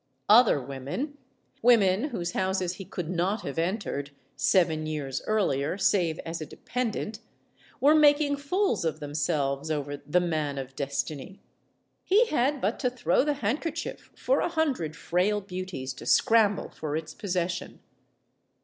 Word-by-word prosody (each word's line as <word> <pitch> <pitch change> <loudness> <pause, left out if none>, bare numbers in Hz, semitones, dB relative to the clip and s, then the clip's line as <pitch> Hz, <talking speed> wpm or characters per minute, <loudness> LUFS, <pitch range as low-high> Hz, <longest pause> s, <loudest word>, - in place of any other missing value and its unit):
Other 220 - +7
women 140 - -5 0.4
women 220 -2 +4
whose 180 - -3
houses 185 -1 -1
he 195 - -8
could 180 -2 -5
not 185 +5 -1
have 140 +3 -4
entered, 165 -6 -2 0.3
seven 160 -4 +2
years 140 -4 -3
earlier, 185 -7 +1
save 185 -4 +2
as 165 0 -5
a - - -3
dependent 225 - -3 0.6
were 285 +4 +6
making 290 -1 +4
fools 365 - 0
of 160 -1 -1
themselves 145 -1 -1
over 145 -2 -2
the 150 +5 +1
Man 155 -5 -1
of 135 0 -6
Destiny. 140 +5 -4 0.6
He 420 +6 +4
had 280 +1 +1
but 215 0 -1
to 250 - +1
throw 250 +1 +1
the 295 0 +1
handkerchief 300 +8 -3
for - - +1
a - - 0
hundred 275 - -1
frail 180 +6 +1
beauties 185 -9 -5
to - - -10
scramble 215 -3 +3
for 150 -1 -4
its 160 0 -4
possession. 180 -3 -3
185 Hz, 140 wpm, -27 LUFS, 155-235 Hz, 0.6 s, Other